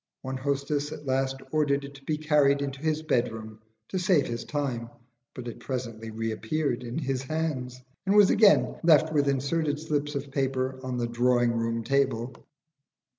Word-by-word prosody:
One 130 0 -3
hostess 140 +2 -1
at 150 - -8
last 135 0 0 0.2
ordered 145 -2 +1
it 140 - -10
to 135 -1 -14
be 150 +2 -1
carried 145 -2 +3
into 135 -1 -4
his 155 0 0
bedroom 110 -6 -1 0.3
to 185 - -1
save 180 -5 +3
his 120 0 -4
time; 130 -6 -3 0.5
but 125 -1 -7
it 120 - -7
presently 115 -4 -5
reappeared 115 +5 -2
in 120 +2 -5
his 135 -4 -1
hands, 135 -4 -3 0.3
and 195 - +3
was 205 -2 +7
again 205 -2 +5
left 160 -1 +5
with 145 -2 +2
inserted 145 +2 0
slips 150 -1 -2
of 140 0 -4
paper 130 -1 -1
on 130 -1 -3
the 120 - 0
drawing 120 0 +2
room 115 0 -1
table. 135 -2 0
135 Hz, 170 wpm, -27 LUFS, 125-150 Hz, 0.5 s, was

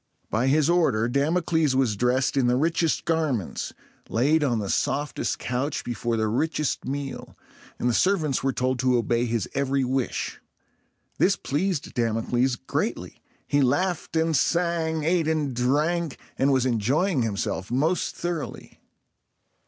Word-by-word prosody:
By 115 +4 +1
his 150 +2 +3
order, 150 -11 +2
Damocles 155 +2 +1
was 130 -5 +2
dressed 125 +5 +1
in 135 -3 +3
the 125 - +3
richest 165 +3 +1
garments, 155 - -1 0.4
laid 150 +7 +2
on 125 -5 +1
the 105 -2 -3
softest 145 +1 -1
couch 130 +4 -2
before 120 -1 -2
the 110 0 +1
richest 150 +6 -1
meal, 140 +1 -5 0.4
and - - -1
the 120 - +2
servants 160 - +2
were 135 - +2
told 130 0 -1
to 125 0 +3
obey 120 +1 +1
his 115 -3 -1
every 140 0 +1
wish. 130 0 -2 0.8
This 190 +1 +4
pleased 165 +2 -2
Damocles 120 +2 +1
greatly. - - -3 0.3
He 145 - +2
laughed 165 +8 0
and 160 0 +2
sang, 165 +1 +1
ate 165 0 +2
and 150 -5 0
drank, 150 +6 0 0.2
and 135 +1 +2
was 130 -2 +2
enjoying 130 - +1
himself 100 -3 -2
most 155 +9 0
thoroughly. 175 -3 -5
135 Hz, 140 wpm, -25 LUFS, 125-160 Hz, 0.8 s, This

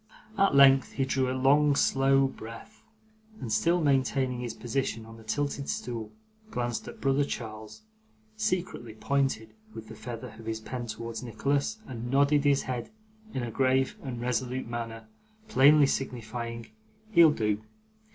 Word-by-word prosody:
At 195 -7 +3
length, 135 -1 +6
he 135 - 0
drew 130 -1 0
a 130 - -1
long 145 +2 +4
slow 135 0 +3
breath, 115 - -8 0.6
and 115 - -5
still 170 +11 +3
maintaining 135 -4 +1
his 120 -2 -4
position 120 -2 -2
on 115 0 -12
the 110 - -14
tilted 140 +5 -2
stool, 115 -3 -4 0.4
glanced 120 - -3
at - - -9
brother 135 +1 +2
Charles, 110 - -7 0.5
secretly 185 - -2
pointed 120 -4 -1 0.2
with 110 -1 -9
the 110 - -9
feather 115 +1 -7
of 115 - -11
his 110 0 -2
pen 120 +2 -6
towards 115 +1 -5
Nicholas, 140 - -1
and 120 - -6
nodded 140 +2 +3
his 140 -1 +3
head 125 -2 -4 0.5
in 130 - -1
a 120 - -4
grave 130 +1 +2
and 125 -4 -5
resolute 125 +1 -2
manner, 115 -1 -5 0.4
plainly 150 -6 +6
signifying 115 -3 -4 0.4
'He'll 170 -5 +8
do. 105 -7 0
130 Hz, 150 wpm, -28 LUFS, 115-140 Hz, 0.6 s, He'll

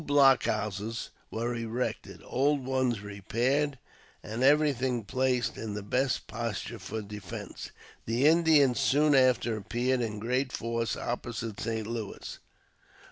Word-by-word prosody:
New - - -11
block 135 -3 +5
houses 105 +1 -2 0.2
were 115 +2 -2
erected, 115 +1 -3
old 140 +1 +1
ones 130 -4 0
repaired, 120 +8 0 0.5
and 110 +3 -5
everything 130 -4 +3
placed 125 +2 0
in 105 -2 -4
the 105 - -4
best 130 +5 0
posture 115 0 -4
for 105 +3 -5
defence. 105 -3 -7 0.4
The 120 +5 +1
Indians 155 -5 +5
soon 145 +2 +4
after 130 -3 +4
appeared 120 +5 0
in 110 -3 -2
great 125 +4 -1
force 115 -1 -2
opposite 115 -3 -4
St. 110 -2 -2
Louis. 110 -2 -6
120 Hz, 130 wpm, -29 LUFS, 110-130 Hz, 0.5 s, block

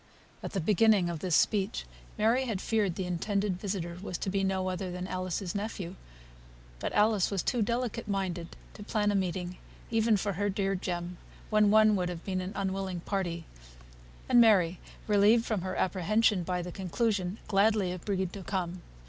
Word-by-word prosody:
At - - -6
the 195 - 0
beginning 200 0 +3
of 165 - -5
this 175 0 +1
speech 205 0 +1 0.3
Mary 230 +5 +3
had 220 -6 -2
feared 205 -4 0
the 190 - -3
intended 190 +2 -1
visitor 180 -4 -4
was 180 -3 -4
to 190 - -3
be 195 0 0
no 190 -1 0
other 185 0 -3
than 180 +1 -4
Alice's 185 -1 -3
nephew; 200 -4 -4 0.9
but - - -2
Alice 210 -2 +3
was 195 -3 -1
too 245 - 0
delicate 235 +1 -1
minded 185 -4 -3 0.2
to - - -11
plan 210 0 0
a - - 0
meeting, 180 -1 -2 0.3
even 225 -1 +3
for 200 0 -1
her 205 +3 0
dear 195 0 0
Jem, 175 -1 -3 0.3
when 215 -1 +5
one 215 0 +6
would 180 -2 0
have 175 -1 -7
been 185 -1 -1
an 185 +2 -5
unwilling 190 -2 -2
party; 175 -4 -2 0.8
and 240 - +6
Mary, 185 -6 +4 0.3
relieved 210 +3 +4
from 215 -5 -1
her 185 +1 -3
apprehension 200 +2 +2
by 180 0 -2
the 180 - -6
conclusion, 190 +1 -1
gladly 200 -2 +3
agreed 185 0 -2
to 200 - -6
come. 180 -2 -3
195 Hz, 175 wpm, -30 LUFS, 180-210 Hz, 0.9 s, one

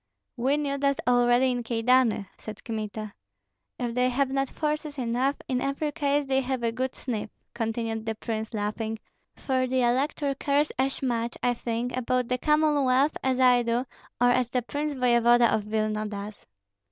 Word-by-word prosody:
"We 265 +3 +1
knew 280 -2 -2
that 280 0 +1
already 245 +1 +4
in 245 -1 -1
Kyedani," 235 -1 +2
said 215 -1 -9
Kmita. 215 -2 -5 0.6
"If 240 -2 -3
they 250 +1 +2
have 265 +1 0
not 270 -1 0
forces 300 -1 -3
enough, 255 +3 0
in 255 -2 0
every 275 +2 -1
case 285 0 0
they 270 0 +1
have 260 -1 -3
a 230 - +1
good 255 +2 -3
sniff," 220 -4 -4 0.2
continued 225 -1 -3
the 225 - -1
prince, 220 0 -4
laughing; 220 +2 -2 0.4
"for 260 -1 0
the 255 0 +1
elector 275 +3 +1
cares 285 +2 +1
as 270 +1 0
much, 235 -2 -1
I 245 - +3
think, 235 +1 -3
about 255 -1 0
the 250 0 0
Commonwealth 295 -2 +3
as 260 0 +1
I 250 -1 +6
do, 235 +2 0 0.3
or 245 0 +5
as 245 -1 +1
the 250 0 -1
prince 290 +4 -3
voevoda 240 -1 +4
of 210 - 0
Vilna 215 0 -1
does." 205 0 -8
250 Hz, 170 wpm, -27 LUFS, 230-270 Hz, 0.6 s, I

